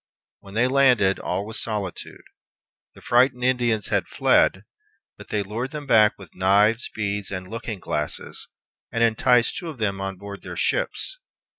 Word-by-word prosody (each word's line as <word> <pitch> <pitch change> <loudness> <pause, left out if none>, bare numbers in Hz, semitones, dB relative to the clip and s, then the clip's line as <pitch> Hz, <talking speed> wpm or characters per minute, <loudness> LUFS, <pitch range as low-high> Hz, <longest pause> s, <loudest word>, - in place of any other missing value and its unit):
When 100 0 -13
they 120 +3 +3
landed, 125 -8 +4
all 100 - -2
was 110 +1 -3
solitude. 105 -5 -5 0.7
The - - -16
frightened 125 +1 +3
Indians 120 -4 +1
had - - 0
fled, - - +3 0.5
but - - -13
they 105 -1 -1
lured 115 +6 -4
them 150 0 -7
back 110 -5 +4
with 95 -5 -14
knives, 105 +5 +3
beads, 105 -2 -2
and 95 -1 -5
looking 115 -1 -5
glasses, 75 -3 -4 0.4
and 115 - +1
enticed 115 +1 +3
two 175 -3 -5
of 150 - -8
them 100 -4 -1
on 95 -1 -4
board 100 +1 -9
their - - -8
ships. - - -1
110 Hz, 160 wpm, -24 LUFS, 100-125 Hz, 0.7 s, landed